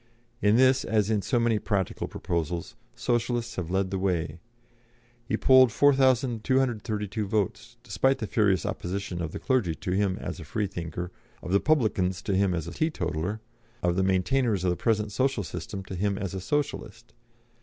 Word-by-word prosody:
In 105 +1 +4
this, 130 +2 +4
as 110 -1 +1
in 105 -2 +2
so 120 +4 +1
many 115 -2 +2
practical 100 -4 -2
proposals, 85 0 -3 0.2
Socialists 120 0 -1
have 90 -3 -3
led 95 +1 0
the 95 - -1
way. 85 -4 -1 0.9
He - - 0
polled 130 -2 +6
4,232 120 -5 +2
votes, 110 +3 -2
despite 135 +2 +1
the 120 - -3
furious 100 -4 +2
opposition 90 -1 -3
of 80 -2 -3
the - - -5
clergy 120 - 0
to 90 - -4
him 95 0 +1
as - - -5
a - - -7
Freethinker, 85 +2 -4 0.3
of - - -5
the 100 - +4
publicans 100 - +1
to 100 - 0
him 95 -2 +2
as 85 -1 -3
a - - -5
teetotaler, 100 - -2 0.4
of 90 0 +2
the 95 - +2
maintainers 95 +3 +1
of 90 - +2
the - - 0
present 105 +1 0
social 130 -1 0
system 95 +4 -6
to 95 - -8
him 100 +2 -1
as 100 -2 -4
a 95 - -4
Socialist. 120 -3 -3
100 Hz, 170 wpm, -27 LUFS, 90-120 Hz, 0.9 s, polled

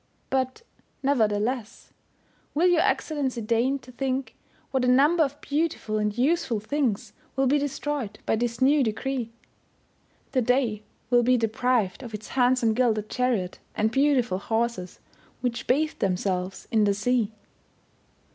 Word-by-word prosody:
But 260 - -1 0.4
nevertheless, 225 -3 0 0.6
will 330 +4 +3
your 350 -2 +4
Excellency 290 - 0
deign 235 +5 +1
to 255 -2 -14
think 265 +1 -2 0.4
what 265 -2 +1
a - - +2
number 290 +7 +5
of 285 0 -3
beautiful 290 -8 -1
and 210 0 -1
useful 260 -4 +1
things 240 -2 -1 0.2
will 270 - +2
be 285 +3 +3
destroyed 285 -5 -3
by - - +2
this 235 +1 -2
new 285 +2 +5
decree. 245 +1 -2 1.0
The 260 - +2
day 245 -3 +1 0.3
will 245 0 +6
be 250 +1 +3
deprived 225 -2 0
of 235 -4 -7
its 215 +1 -9
handsome 250 -3 +3
gilded 220 -3 +1
chariot, 235 -8 0 0.2
and 215 +1 +1
beautiful 265 -7 +2
horses, 225 -4 -2 0.4
which 245 -1 -2
bathe 305 +5 +1
themselves 185 0 -1
in 220 -2 +4
the 200 -1 +2
sea. 225 0 +1
245 Hz, 135 wpm, -26 LUFS, 215-270 Hz, 1.0 s, will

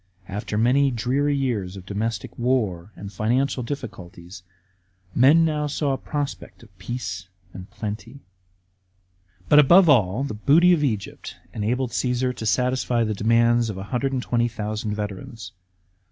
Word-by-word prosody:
After 105 +1 -4
many 130 +5 +3
dreary 135 +4 0
years 105 -9 -2
of 95 - -11
domestic 105 +1 -4
war 110 -7 -1
and 100 0 -9
financial 125 +6 0
difficulties, 100 -9 -8 0.7
men 145 +7 +5
now 150 -2 -1
saw 145 -1 -1
a - - -1
prospect 145 -2 -5
of 100 - -19
peace 95 -4 -5 0.3
and 95 +1 -10
plenty. 115 +5 -7 1.3
But, 150 - +7
above 170 +5 +7
all, 115 -2 +3
the 140 - -4
booty 160 +12 +4
of 155 -4 +1
Egypt 110 -8 -3 0.2
enabled 120 +4 -1
Csesar 125 0 -1
to 110 - -5
satisfy 125 0 +1
the 110 -1 -1
demands 115 +2 +2
of 105 - -4
120,000 115 -2 -2
veterans. 105 0 -6
120 Hz, 130 wpm, -23 LUFS, 105-135 Hz, 1.3 s, But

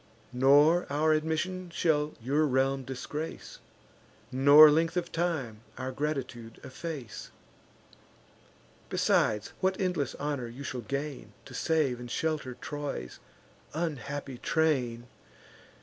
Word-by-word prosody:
Nor 145 +7 +5
our 155 +2 +3
admission 160 +4 -1
shall 155 -3 0
your 145 +6 +1
realm 135 0 +1
disgrace, 135 +5 -6 0.7
Nor 145 +4 +8
length 165 +3 +1
of 175 -1 -2
time 160 -10 -2 0.2
our 130 0 -4
gratitude 125 -5 -4
efface. 135 -4 -7 1.6
Besides, 105 -1 +1
what 190 0 0
endless 180 -8 -1
honour 145 -4 -3
you 120 +4 -9
shall 130 -2 -4
gain, 140 -3 -5
To - - -12
save 150 -7 +1
and 120 0 -8
shelter 150 -3 -2
Troy's 145 - -6 0.6
unhappy 140 -5 -4
train! 130 -7 0
145 Hz, 105 wpm, -29 LUFS, 125-160 Hz, 1.6 s, Nor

